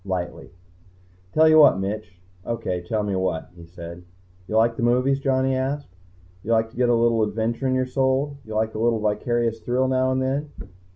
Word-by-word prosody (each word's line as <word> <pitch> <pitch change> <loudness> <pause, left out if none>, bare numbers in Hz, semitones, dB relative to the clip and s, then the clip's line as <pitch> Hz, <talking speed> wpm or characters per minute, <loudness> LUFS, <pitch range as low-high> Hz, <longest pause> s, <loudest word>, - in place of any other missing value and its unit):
Lightly. 95 -3 -4 0.8
"Tell 160 +1 +5
you 155 0 +7
what, 145 - +7
Mitch." 100 -1 -5 0.2
"O.K., 95 -5 -3
tell 110 -1 0
me 100 -2 -2
what," 95 -3 -2
he 85 -1 -13
said. 85 0 -10 0.4
"You 110 - 0
like 115 +1 +3
the - - -5
movies?" 125 +3 +2
Johnny 135 -1 +1
asked. 135 -5 -3 0.5
"You 115 +4 -1
like 115 0 +1
to - - -20
get 125 0 +2
a 120 - +4
little 115 -1 +2
adventure 110 +4 -1
in 130 - +1
your 130 0 +1
soul? 135 +2 0
You 110 -2 -8
like 110 0 0
a 110 - -5
little 115 0 +2
vicarious 115 +2 0
thrill 125 +3 0
now 130 0 +1
and 130 - 0
then?" 140 +3 -2
115 Hz, 195 wpm, -23 LUFS, 105-130 Hz, 0.8 s, you